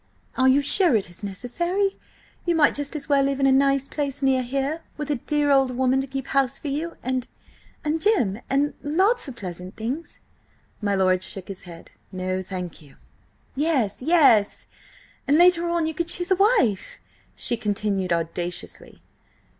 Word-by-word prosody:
"Are 260 - +3
you 275 +2 +4
sure 340 - +5
it 195 -4 0
is 175 - -12
necessary? 345 - -2 0.4
You 345 -1 +1
might 305 -3 +4
just 290 +1 -4
as 290 - -5
well 285 -2 +3
live 275 0 -1
in 275 - +2
a 270 - +5
nice 275 0 +2
place 280 -2 -4
near 265 -1 +3
here, 275 +5 -2 0.2
with 295 0 -3
a 290 - 0
dear 295 -1 +2
old 270 -1 +4
woman 260 +1 +1
to 270 - -5
keep 270 -1 -5
house 275 -1 +1
for 295 - -5
you–and–and 300 +1 -5
Jim–and–lots 295 - +1
of 265 - -7
pleasant 180 -2 -8
things." 260 +9 -5 0.6
My 205 -1 0
lord 185 -1 +2
shook 190 +1 -4
his 195 -1 -7
head. 165 -1 -12 0.2
"No, 185 0 -3
thank 180 -3 -7
you!" 145 -3 -17 0.6
"Yes, 270 -9 0
yes! 270 -9 +3 0.6
And 285 +2 +4
later 345 0 +4
on 340 -1 0
you 320 - -2
could 335 +2 -2
choose 355 +2 +1
a - - +6
wife!" 390 - +1 0.4
she 240 - 0
continued 205 -3 -2
audaciously. 170 +1 -4
270 Hz, 160 wpm, -24 LUFS, 205-305 Hz, 0.6 s, a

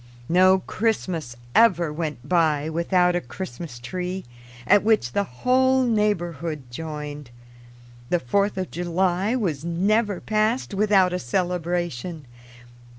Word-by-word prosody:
No 185 +2 +5
Christmas 185 - -2 0.2
ever 175 -9 +4
went 150 -5 -5
by 160 -3 +2
without 180 +2 +2
a 175 - 0
Christmas 120 0 -7
tree, 180 +9 -5 0.4
at 205 +6 +5
which 215 - +2
the 200 +7 0
whole 260 - +2
neighborhood 175 - -1
joined. 150 -1 -6 0.8
The 175 - +2
Fourth 200 +9 0
of 185 -1 -3
July 180 +5 0
was 165 - -2
never 200 +4 +1
passed 215 +2 0
without 195 -3 +3
a 180 - -1
celebration. 175 -1 -2
180 Hz, 115 wpm, -24 LUFS, 155-200 Hz, 0.8 s, No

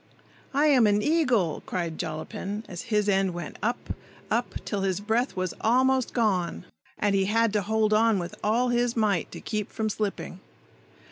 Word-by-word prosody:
"I 290 +2 +4
am 260 -7 +5
an 205 0 +2
eagle!" 255 - +2
cried 170 -3 -3
Jollapin, 180 +6 -4
as 175 -2 -6
his 210 -2 +2
end 190 -3 +2
went 175 -2 -7
up, 235 +4 -2 0.4
up, - - 0
till 205 -2 -2
his 190 -1 0
breath 225 +5 0
was 185 -1 -2
almost 260 +2 +3
gone, 185 - 0 0.3
and 205 -1 +1
he 195 -1 +2
had 225 +1 +2
to 210 - +2
hold 215 +1 +1
on 220 0 +4
with 175 -1 -4
all 235 +4 +2
his 240 0 +1
might 205 -6 +1
to - - -8
keep 210 -2 -3
from 220 -1 -2
slipping. 205 -3 -3
210 Hz, 175 wpm, -27 LUFS, 190-230 Hz, 0.4 s, am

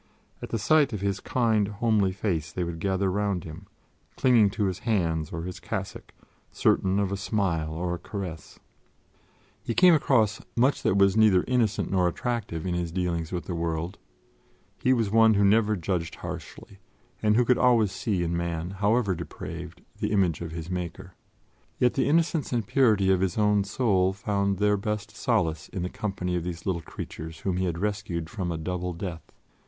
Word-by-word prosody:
At - - -6
the - - -1
sight 145 +4 +3
of 105 - -4
his 100 -1 -1
kind, 110 -4 +1
homely 105 -2 +1
face, 85 -6 -2
they 90 - -2
would 85 -1 -5
gather 95 +1 0
round 100 -3 -1
him, 85 +5 -10 0.5
clinging 120 -5 +4
to 105 +1 -2
his 95 -1 -2
hands 85 -9 0
or 80 0 -4
his 90 0 -6
cassock, - - -5 0.4
certain 95 +1 +2
of 100 -1 0
a - - 0
smile 95 -7 -1
or 85 +2 -2
a 90 - -4
caress. 90 -5 -7 1.0
He 115 - -3
came 180 -1 +7
across 120 -8 +2
much 130 +4 +2
that 95 - +2
was 100 0 +4
neither 105 -5 +5
innocent 120 -4 +1
nor 90 -2 +3
attractive 95 -4 -3
in 90 - -1
his 85 -1 -2
dealings 85 -2 -2
with 90 -2 -3
the 90 - -4
world; 85 +1 -3 0.8
he 130 - +3
was 115 -5 +2
one 115 0 +5
who 100 0 +4
never 105 +1 +4
judged 85 -3 -2
harshly, 100 - -8 0.4
and 105 -1 +3
who 125 +1 +4
could 125 +1 +3
always 115 -5 +4
see 95 -2 -1
in 85 0 -1
man, 85 0 -3
however 105 +1 +1
depraved, 85 -1 -7 0.2
the - - -1
image 90 -7 +1
of 85 - -4
his 80 0 -6
Maker; 90 0 -5 0.6
yet 125 - +3
the 135 0 +1
innocence 165 -1 +1
and 120 -4 0
purity 105 -7 +3
of 95 -1 +2
his 95 -3 0
own 105 -1 +3
soul 100 -3 +1
found 100 0 -1
their 105 +1 +2
best 105 0 -4
solace 85 -10 0
in 90 - -4
the 90 - -2
company 90 -4 -3
of 85 - -1
these 85 -1 -6
little 90 -3 -1
creatures 80 +1 -8
whom 95 -2 -1
he 95 - 0
had 85 -2 -2
rescued 90 -4 -3
from 95 -5 -3
a 85 - -2
double 90 +2 -3
death. 85 -1 -7
95 Hz, 185 wpm, -27 LUFS, 85-110 Hz, 1.0 s, came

